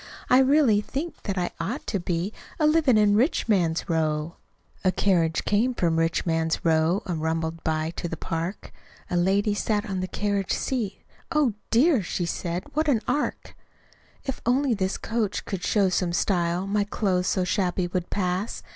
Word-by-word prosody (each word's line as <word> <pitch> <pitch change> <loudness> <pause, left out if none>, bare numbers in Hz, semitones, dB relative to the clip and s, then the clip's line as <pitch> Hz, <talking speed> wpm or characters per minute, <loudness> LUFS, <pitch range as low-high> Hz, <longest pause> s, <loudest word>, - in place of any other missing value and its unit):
I 255 - +7
really 265 -6 +4
think 290 +10 -5
that 195 -2 -2
I 175 -1 -1
ought 205 - -3
to 200 - -1
be 175 +3 -2 0.3
A 305 - +3
livin' 300 -6 +4
in 205 -1 +4
Rich 250 +7 +2
Man's 175 -6 +1
Row." 160 -1 -1 0.5
A 185 - +4
carriage 170 -5 +1
came 235 +5 +2
from 165 -5 +1
"Rich 165 0 0
Man's 165 -1 0
Row," 160 +3 +2
An' 175 -3 -2
rumbled 160 +1 -2
by 160 0 -1
to - - -2
the 165 - -5
park. 170 +4 -4 0.4
A - - 0
lady 195 +4 +2
sat 210 +1 -1
on 190 -2 -2
the 185 - -2
carriage 200 0 -1
seat; 225 -7 -2 0.3
"Oh, 300 -8 +2 0.2
dear," 255 - +4
said 175 0 -3
she, - - -17
"what 310 +2 0
an 250 -7 +3
ark! 295 - -2 0.7
"If 270 - -4
only 255 +2 +2
this 190 -2 -1
coach 220 -3 -2
could 190 -3 -4
show 200 -3 +2
some 180 -1 0
style, 175 0 +1
My 205 +1 +1
clothes, 190 -3 0
so 185 - +1
shabby, 180 -1 0
would 175 0 -3
pass. 185 +2 -2
190 Hz, 175 wpm, -25 LUFS, 170-220 Hz, 0.7 s, I